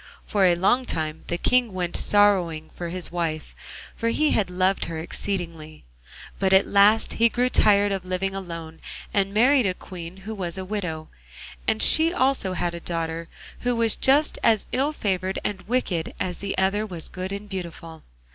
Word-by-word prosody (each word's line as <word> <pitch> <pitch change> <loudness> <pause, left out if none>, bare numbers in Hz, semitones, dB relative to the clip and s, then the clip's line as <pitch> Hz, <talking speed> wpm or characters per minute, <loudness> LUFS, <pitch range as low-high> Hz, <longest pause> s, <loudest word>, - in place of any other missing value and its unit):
For 200 -2 +2
a 175 -1 +5
long 200 +9 +2
time 155 -4 -3
the 175 - -1
King 245 +2 +2
went 180 -2 -3
sorrowing 185 -6 +2
for 175 -1 -5
his 180 0 -3
wife, 165 -3 -3 0.4
for 230 - -1
he 305 +6 +2
had 200 -4 +1
loved 185 +2 +1
her 165 - -5
exceedingly; 165 -2 -5 0.6
but 190 -1 +2
at 190 +1 +6
last 205 +2 +4
he 230 0 +4
grew 250 +2 +1
tired 205 -3 +4
of 195 -2 -2
living 185 +1 -2
alone, 165 -4 -7 0.3
and 195 -1 +1
married 245 +3 +4
a 185 - -1
Queen 180 -1 -9
who 220 - -4
was 180 -3 -4
a 190 - -5
widow, 180 -6 -4 0.6
and 110 - +2
she 320 +1 +5
also 260 - +1
had 175 -1 -2
a 170 - -5
daughter, 165 -1 -3 0.3
who 245 0 0
was 230 -1 +1
just 285 +3 +2
as 225 -3 +3
ill 275 +4 +1
favoured 190 -8 -2
and 195 -3 -3
wicked 205 -9 -1
as 180 -2 -3
the 200 -1 -3
other 195 +2 +1
was 175 -7 -6
good 185 +1 -6
and 200 +1 -6
beautiful. 170 -4 -7
190 Hz, 180 wpm, -24 LUFS, 170-215 Hz, 0.6 s, at